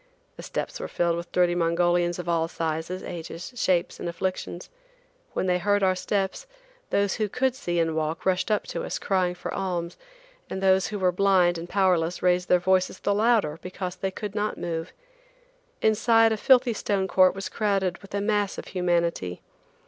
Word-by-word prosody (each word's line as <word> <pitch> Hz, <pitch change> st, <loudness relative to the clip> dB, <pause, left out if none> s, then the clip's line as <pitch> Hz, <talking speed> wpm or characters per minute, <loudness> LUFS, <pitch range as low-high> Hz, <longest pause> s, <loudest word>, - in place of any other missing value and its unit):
The -, -, -9 dB
steps -, -, -4 dB
were -, -, -4 dB
filled 170 Hz, -1 st, 0 dB
with 170 Hz, 0 st, -6 dB
dirty 180 Hz, -1 st, +3 dB
Mongolians 175 Hz, 0 st, +1 dB
of 175 Hz, -1 st, -6 dB
all 165 Hz, -1 st, +1 dB
sizes, 165 Hz, +3 st, -3 dB
ages, 170 Hz, +5 st, -7 dB
shapes 185 Hz, -7 st, 0 dB
and -, -, -3 dB
afflictions. 180 Hz, 0 st, -4 dB, 0.7 s
When -, -, -1 dB
they 180 Hz, -1 st, +2 dB
heard 205 Hz, +1 st, +2 dB
our 185 Hz, -1 st, +4 dB
steps, 195 Hz, -, -2 dB, 0.4 s
those 200 Hz, -1 st, +1 dB
who 215 Hz, -2 st, -1 dB
could 260 Hz, +3 st, +1 dB
see 175 Hz, -10 st, -3 dB
and 165 Hz, -1 st, +1 dB
walk, 160 Hz, +1 st, -2 dB
rushed 185 Hz, +1 st, +1 dB
up 210 Hz, -1 st, +1 dB
to -, -, -3 dB
us, -, -, -3 dB
crying 185 Hz, -2 st, 0 dB
for -, -, -6 dB
alms, 175 Hz, -3 st, -3 dB, 0.5 s
and -, -, -4 dB
those 190 Hz, -1 st, +3 dB
who 210 Hz, -, -4 dB
were 185 Hz, -2 st, +2 dB
blind 180 Hz, -2 st, +3 dB
and 170 Hz, +1 st, -8 dB
powerless 180 Hz, -3 st, +1 dB
raised 180 Hz, 0 st, +2 dB
their 180 Hz, -, +6 dB
voices 185 Hz, +1 st, +1 dB
the 200 Hz, -, +1 dB
louder 210 Hz, -8 st, +2 dB
because 185 Hz, 0 st, -5 dB
they 190 Hz, +1 st, -2 dB
could 205 Hz, +1 st, -6 dB
not 210 Hz, 0 st, -2 dB
move. 165 Hz, -1 st, -4 dB, 0.9 s
Inside, 225 Hz, +1 st, +4 dB
a 220 Hz, -, 0 dB
filthy 250 Hz, +1 st, +4 dB
stone 200 Hz, -2 st, -1 dB
court 185 Hz, -1 st, +4 dB
was 195 Hz, 0 st, -4 dB
crowded 195 Hz, -5 st, 0 dB
with 195 Hz, 0 st, -9 dB
a 200 Hz, -, 0 dB
mass 205 Hz, -1 st, 0 dB
of -, -, -6 dB
humanity. 170 Hz, -, -1 dB
185 Hz, 185 wpm, -26 LUFS, 175-200 Hz, 0.9 s, their